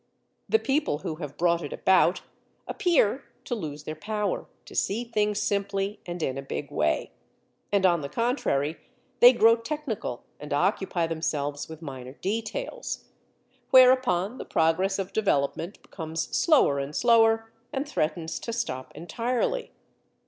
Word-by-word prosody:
The 445 - +5
people 290 - 0
who 155 +1 -5
have 150 -3 -7
brought 170 0 +2
it 145 - -6
about 190 0 +3 0.5
appear 300 - +2 0.2
to - - -3
lose 150 -9 -5
their 155 - -5
power 210 +3 -2 0.2
to - - -12
see 215 +5 0
things 210 -3 0
simply 200 0 -1
and 175 -1 -4
in 135 -1 -1
a - - -4
big 135 - -5
way; - - 0 0.6
and, 200 -2 +3
on 175 -3 +4
the 140 - -5
contrary, 165 - 0 0.4
they 245 - +10
grow 230 -2 +5
technical 230 - -4 0.2
and 150 0 -5
occupy 180 +2 +1
themselves 150 -3 -2
with 160 0 -10
minor 130 -3 -7
details. 230 - -4 0.6
Whereupon 255 -5 +5
the - - -6
progress 175 +5 +1
of 195 -1 -4
development 170 -2 0
becomes 160 -2 -5
slower 275 - +4
and 140 +2 -5
slower, 225 -1 +4 0.2
and 275 +2 -2
threatens 165 - -2
to 230 - -5
stop 130 - -3
entirely. 240 - -2
195 Hz, 140 wpm, -27 LUFS, 155-230 Hz, 0.6 s, they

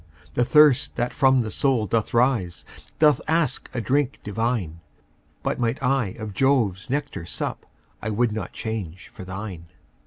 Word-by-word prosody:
The 120 - +2
thirst 145 +1 +5
that 120 0 -1
from 130 -2 +4
the 110 -2 -4
soul 130 -6 +1
doth 110 +2 0
rise, 115 -8 +1 0.3
Doth 150 -3 +4
ask 160 -3 +1
a 125 - -3
drink 140 +3 0
divine: 105 -6 -2 0.6
But - - -1
might 120 +1 0
I 125 -6 +1
of 110 -3 -6
Jove's 115 -4 +1
nectar 145 - -2
sup, - - -5 0.3
I 110 - -3
would 115 +2 +1
not 110 +1 -4
change 95 -6 -5
for - - -9
thine. 95 -2 -7
120 Hz, 155 wpm, -24 LUFS, 105-135 Hz, 0.6 s, thirst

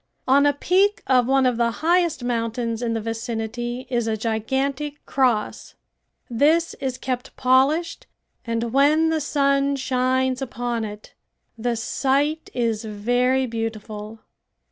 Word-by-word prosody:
On 280 +2 +5
a 290 - +3
peak 380 +8 +2
of 250 -2 +3
one 270 0 +3
of 250 -2 +2
the 235 -1 +2 0.2
highest 340 -5 +2
mountains 230 -1 -2
in 230 -1 -1
the 225 - -2
vicinity 230 +2 -4
is 240 -2 -1
a 220 -1 0
gigantic 265 +7 -2
cross. 245 -6 0 0.5
This 310 +8 +2
is 260 -2 -2
kept 255 0 -4
polished 270 +7 +2 0.4
and 230 0 -2
when 300 +4 +4
the 320 -1 0
sun 280 -1 +1
shines 260 0 0
upon 240 -3 -3
it 210 0 -10 0.4
the 235 +1 -1
sight 280 +6 0
is 230 -2 0
very 245 +5 +1
beautiful. 220 -2 -5
250 Hz, 130 wpm, -23 LUFS, 230-275 Hz, 0.5 s, On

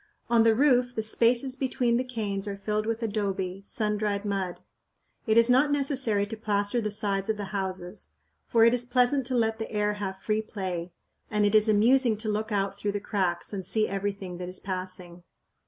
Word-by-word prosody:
On 235 -1 +5
the 225 -1 +4
roof 250 -2 +3
the 220 - -1
spaces 240 +4 +3
between 250 -3 0
the 250 - 0
canes 210 -5 -3
are 200 -1 -4
filled 210 +2 -2
with 230 +1 -2
adobe, 195 -3 -2
sun 210 -2 +1
dried 205 -1 -1
mud. 195 -3 -2 0.7
It 220 +1 +3
is 230 0 +6
not 260 +4 +4
necessary 265 -8 +1
to 215 +2 -6
plaster 210 +1 -1
the 215 - -2
sides 200 -1 -1
of 220 - 0
the 200 -1 -6
houses, 190 -1 -4 0.4
for 230 -1 +4
it 230 - +5
is 245 -1 +2
pleasant 250 +1 +2
to 255 -1 0
let 225 -1 0
the 220 - -5
air 210 -1 0
have 195 -2 -5
free 215 +2 -1
play, 185 -5 -5 0.4
and 210 -1 +1
it 205 - +1
is 215 0 +5
amusing 230 +2 +4
to 215 +1 -3
look 215 +1 -2
out 200 -1 -1
through 205 -1 -2
the 205 - -2
cracks 190 -3 -2
and 195 -2 -3
see 215 +4 +1
everything 195 -2 -4
that 180 0 -5
is 185 - -3
passing. 185 -2 -6
210 Hz, 205 wpm, -27 LUFS, 195-230 Hz, 0.7 s, is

